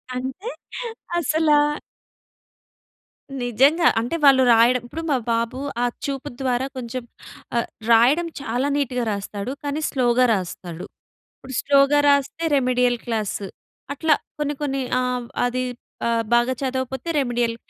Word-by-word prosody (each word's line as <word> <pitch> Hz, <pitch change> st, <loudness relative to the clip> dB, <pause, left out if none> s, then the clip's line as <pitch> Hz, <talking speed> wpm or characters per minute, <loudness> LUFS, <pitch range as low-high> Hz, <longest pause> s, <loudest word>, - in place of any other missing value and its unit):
అంటే 265 Hz, -, -4 dB, 0.7 s
అసలా. 310 Hz, -1 st, +3 dB, 1.8 s
నిజంగా. 275 Hz, +8 st, +4 dB
అంటే 240 Hz, +8 st, -3 dB
వాళ్ళు 265 Hz, -2 st, +7 dB
రాయడం 235 Hz, +2 st, +4 dB
ఇప్పుడు 325 Hz, +6 st, -6 dB
మా 275 Hz, -, +3 dB
బాబు 230 Hz, +2 st, -1 dB, 0.2 s
ఆ -, -, +3 dB, 0.2 s
చూపు 275 Hz, -2 st, -4 dB
ద్వారా 255 Hz, -1 st, 0 dB
కొంచెం 250 Hz, 0 st, -5 dB, 0.5 s
ఆహ్, 235 Hz, -, 0 dB, 0.2 s
రాయడం 260 Hz, +10 st, +5 dB
చాలా 250 Hz, +1 st, -1 dB
నీట్‌గా 250 Hz, -3 st, -1 dB
రాస్తాడు. 200 Hz, +3 st, -4 dB
కానీ 290 Hz, +2 st, -2 dB
స్లోగా 250 Hz, -2 st, +3 dB
రాస్తాడు. 180 Hz, -3 st, -5 dB, 0.5 s
ఇప్పుడు 260 Hz, -1 st, -8 dB
స్లో‌గా 280 Hz, +1 st, +4 dB
రాస్తే 280 Hz, +3 st, +1 dB
రెమెడియల్ 250 Hz, -2 st, +2 dB
క్లాసు. 215 Hz, -4 st, -2 dB, 0.5 s
అట్లా 310 Hz, +2 st, +2 dB, 0.3 s
కొన్ని 295 Hz, 0 st, -1 dB
కొన్ని 275 Hz, -2 st, -1 dB, 0.2 s
ఆహ్, 250 Hz, -1 st, -2 dB, 0.2 s
అది 250 Hz, +1 st, -1 dB, 0.4 s
ఆహ్, 230 Hz, -1 st, +1 dB
బాగా 240 Hz, +2 st, +3 dB
చదవకపోతే 260 Hz, +2 st, -3 dB
రెమెడియల్. 240 Hz, -3 st, 0 dB
255 Hz, 120 wpm, -22 LUFS, 240-280 Hz, 1.8 s, వాళ్ళు